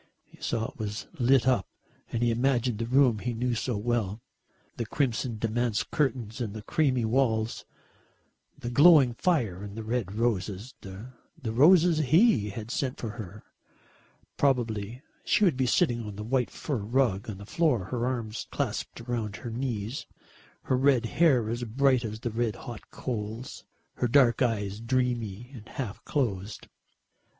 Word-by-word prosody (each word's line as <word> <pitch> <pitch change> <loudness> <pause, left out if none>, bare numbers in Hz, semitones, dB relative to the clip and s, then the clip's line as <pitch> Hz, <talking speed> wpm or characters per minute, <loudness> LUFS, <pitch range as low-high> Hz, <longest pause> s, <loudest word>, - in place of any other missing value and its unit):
He - - -21
saw 115 -1 -1
it - - -25
was 105 +1 -4
lit 130 0 +4
up 125 -8 +2 0.4
and 115 - -1
he 120 - +3
imagined 120 -1 +1
the 115 - -2
room 125 -3 +4
he 120 +2 -3
knew 125 +2 0
so 115 0 -1
well. 110 -2 -1 0.6
The 115 - -2
crimson 120 -4 -1
damask 115 +1 -1
curtains 125 -5 -1
and 110 -3 -3
the 110 - -7
creamy 130 -3 +1
walls, 110 -2 0 0.9
the 120 - -5
glowing 145 -2 +7
fire 115 - 0
and 100 +1 -8
the 110 - -4
red 110 -4 -2
roses, 110 0 -1
the 100 +6 -9 0.4
roses 165 +6 +5
he 155 - +4
had 110 +3 -6
sent 130 -2 -2
for 115 - -4
her. 105 -2 -9 0.9
Probably 120 -3 0 0.2
she - - +2
would 170 -8 +3
be 130 -1 +1
sitting 120 -4 +2
on 105 - -7
that 105 - -6
white 125 +2 0
fur 145 -4 -3
rug 110 -2 0
on 100 - -5
the 100 - -10
floor, 130 - +1
her 120 -1 0
arms 120 -3 -3
clasped - - -3
round 115 -4 -3
her 120 - -7
knees, 115 -1 -3 0.6
her 130 - +1
red 130 -3 +3
hair 130 -4 +3
as 120 +2 -3
bright 130 +2 +2
as 110 0 -5
the 120 - -2
red 115 -1 -1
hot 120 -5 -9
coals, 115 0 -5 0.3
her 125 - +1
dark 120 -2 +4
eyes 105 -4 0
dreamy 120 -2 -1
and 115 -2 -11
half 125 -8 -5
closed. 105 -8 -2
120 Hz, 160 wpm, -28 LUFS, 110-130 Hz, 0.9 s, glowing